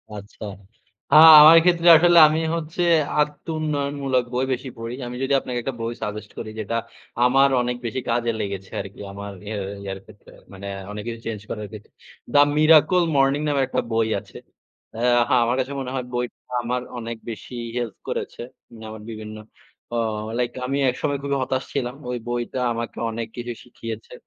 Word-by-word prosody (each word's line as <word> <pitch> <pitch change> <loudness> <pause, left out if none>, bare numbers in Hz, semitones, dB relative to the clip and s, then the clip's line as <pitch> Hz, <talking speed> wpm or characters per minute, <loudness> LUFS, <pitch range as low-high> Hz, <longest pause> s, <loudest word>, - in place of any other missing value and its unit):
আচ্ছা। 105 0 -10 0.7
আ - - +7 0.3
আমার 160 +2 +10
ক্ষেত্রে 175 -1 +2
আসলে 175 +2 +5
আমি 155 +1 0 0.2
হচ্ছে 165 +1 -4 0.4
আত্মউন্নয়নমূলক 145 -3 -1
বই 125 +2 +1
বেশি 130 +1 -5
পড়ি। 115 +1 -6
আমি 120 - -6
যদি 135 +1 0
আপনাকে 125 -2 -4
একটা 130 +1 -4
বই 115 +1 -2
সাজেস্ট 105 0 -5
করি - - -6
যেটা 110 +2 -3 0.5
আমার 135 +2 +5
অনেক 125 0 -1
বেশি 115 +3 -2
কাজে 115 0 +1
লেগেছে 100 -2 -5
আরকি। 95 0 -11
আমার 100 +1 -7 0.2
ইয়া 105 0 -4 0.3
ইয়ার 95 -1 -5
ক্ষেত্রে 105 -1 -17 0.2
মানে 100 +1 -8 0.2
অনেক 105 0 -6
কিছু 115 -1 -5
চেঞ্জ 110 -3 -4
করার 105 -1 -5
ক্ষেত্রে। 105 -2 -12 0.4
"দা 145 - +7 0.2
মিরাকল 160 +4 +5
মর্নিং" 135 +1 +3
নামের 140 -2 +1
একটা - - -1
বই 115 0 +2
আছে। - - -14 0.6
হ্যাঁ 120 +2 +2 0.3
আমার 120 +2 +1
কাছে 130 +1 -2
মনে 130 -1 -5
হয় 130 -2 -3
বইটা 120 0 -3 0.2
আমার 125 +1 -1 0.2
অনেক 115 0 -6
বেশি 115 +3 -8 0.2
হেল্প 120 -4 -3
করেছে। - - -4 0.4
না, - - -11
আমার 110 -1 -9
বিভিন্ন 110 -1 -8 0.6
অ - - 0 0.4
লাইক 120 -1 0 0.2
আমি 135 +2 -1
একসময় 140 +3 -2
খুবই 140 0 -1
হতাশ 130 0 -2
ছিলাম। 125 -2 -2
ওই 125 - -2
বইটা 120 +1 -3
আমাকে 115 0 -5
অনেক 115 0 -4
কিছু 120 0 -4
শিখিয়েছে। 115 -2 -8
120 Hz, 170 wpm, -23 LUFS, 110-140 Hz, 0.7 s, আমার